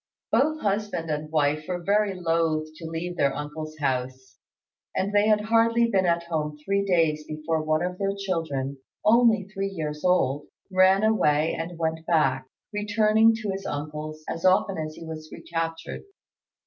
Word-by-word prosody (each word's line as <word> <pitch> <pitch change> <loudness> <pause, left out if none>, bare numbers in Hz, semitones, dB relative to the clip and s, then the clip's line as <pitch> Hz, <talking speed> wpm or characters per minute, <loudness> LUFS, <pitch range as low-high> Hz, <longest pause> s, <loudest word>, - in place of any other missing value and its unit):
Both 310 +3 +2
husband 200 -5 -1
and 150 0 -3
wife 150 0 +1
were 180 -1 -2
very 200 0 +1
loth 165 -2 +1
to 165 - -7
leave 175 +2 -4
their 140 -3 +2
uncle's 155 +1 -6
house, 130 -2 -3 0.6
and 200 +2 -1
they 205 +1 +4
had 210 -1 +4
hardly 230 +1 +3
been 190 -3 +2
at 170 0 +2
home 155 -3 -3
three 200 0 +1
days 165 -5 +2
before 155 +1 -2
one 155 +1 +1
of 180 0 -3
their 195 0 0
children, 160 -8 -2 0.3
only 230 -1 +5
three 195 -1 -2
years 150 -5 -5
old, 145 -6 +2 0.2
ran 190 +2 +5
away 160 -8 +3
and 165 +1 -5
went 160 0 -2
back, 135 -6 +2 0.3
returning 215 +2 +3
to 205 - -1
his 195 0 -4
great - - -2
uncle's 155 +1 -6
as 165 - -4
often 185 -1 +3
as 155 0 -4
he 165 - -9
was 155 -1 -7
recaptured. 165 -1 -4
165 Hz, 165 wpm, -26 LUFS, 155-195 Hz, 0.6 s, only